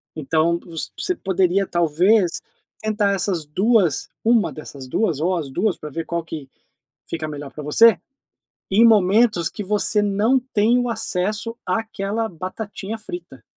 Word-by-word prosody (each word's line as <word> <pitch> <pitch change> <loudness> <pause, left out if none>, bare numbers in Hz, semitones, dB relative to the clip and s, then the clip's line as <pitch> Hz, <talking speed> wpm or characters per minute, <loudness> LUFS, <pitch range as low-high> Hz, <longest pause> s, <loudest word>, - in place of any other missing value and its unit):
Então 160 +3 +1
vo 170 -1 -13 0.2
você 365 - -1
poderia, 190 - +1
talvez, 175 +3 +2 0.4
tentar 210 -2 0
essas 180 -4 -1
2 190 - +2
1 230 -1 +3
dessas 140 -3 -9
2, 165 - 0
ou 180 +3 +1
as 155 -5 -3
2, 185 +8 0
pra 150 - -8
ver 165 +2 -5
qual 170 -1 -3
que 155 -4 -8 0.6
fica 160 -2 -4
melhor 145 -2 -7
pra 150 - -8
você, 200 +7 +5 0.7
em 215 +5 +5
momentos 210 -4 +4
que 210 - -6
você 210 +1 +1
não 205 +6 +2
tem 225 +3 +4
o 245 0 -1
acesso 215 0 -2
àquela 220 0 -2
batatinha 195 +4 -6
frita. 175 - -9
190 Hz, 145 wpm, -21 LUFS, 165-220 Hz, 0.7 s, você